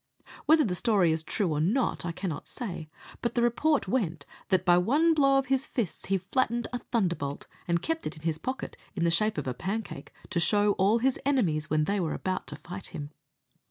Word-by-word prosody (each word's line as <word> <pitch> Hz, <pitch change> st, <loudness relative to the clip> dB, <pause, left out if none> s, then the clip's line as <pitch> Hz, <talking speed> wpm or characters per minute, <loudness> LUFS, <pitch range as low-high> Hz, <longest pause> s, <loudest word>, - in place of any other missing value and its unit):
Whether 310 Hz, 0 st, +6 dB
the 195 Hz, -, -1 dB
story 195 Hz, -4 st, +3 dB
is 160 Hz, 0 st, -1 dB
true 190 Hz, +2 st, 0 dB
or 150 Hz, -2 st, 0 dB
not, 205 Hz, -, +1 dB
I -, -, -1 dB
cannot 170 Hz, -2 st, -5 dB
say, 180 Hz, -10 st, -5 dB, 0.3 s
but 235 Hz, -, -2 dB
the 240 Hz, -, +2 dB
report 285 Hz, +5 st, +2 dB
went 170 Hz, -, -1 dB, 0.2 s
that, 185 Hz, -1 st, +2 dB
by 175 Hz, -1 st, +6 dB
one 295 Hz, -, +3 dB
blow 275 Hz, -3 st, +4 dB
of 270 Hz, -, +1 dB
his 270 Hz, 0 st, +1 dB
fists 220 Hz, -9 st, -3 dB
he 195 Hz, -, +2 dB
flattened 235 Hz, +5 st, 0 dB
a 245 Hz, -, -1 dB
thunderbolt, 175 Hz, -, -2 dB, 0.2 s
and 170 Hz, -1 st, +1 dB
kept 325 Hz, 0 st, -2 dB
it -, -, -5 dB
in 155 Hz, -, -14 dB
his 160 Hz, -1 st, -1 dB
pocket, 260 Hz, +1 st, -4 dB, 0.2 s
in -, -, -1 dB
the 170 Hz, -, +3 dB
shape 215 Hz, +3 st, +2 dB
of 150 Hz, -, -2 dB
a 130 Hz, -, -2 dB
pancake, 200 Hz, -, -5 dB, 0.2 s
to 180 Hz, -, +1 dB
show 205 Hz, +4 st, +4 dB
to -, -, -14 dB
all 200 Hz, +4 st, +4 dB
his 255 Hz, +2 st, +1 dB
enemies, 175 Hz, -, +1 dB
when 155 Hz, 0 st, +2 dB
they 200 Hz, +5 st, 0 dB
were 165 Hz, -4 st, -1 dB
about 185 Hz, -5 st, -3 dB
to 150 Hz, -, -6 dB
fight 180 Hz, +5 st, -7 dB
him. 145 Hz, 0 st, -7 dB
195 Hz, 220 wpm, -28 LUFS, 170-245 Hz, 0.3 s, Whether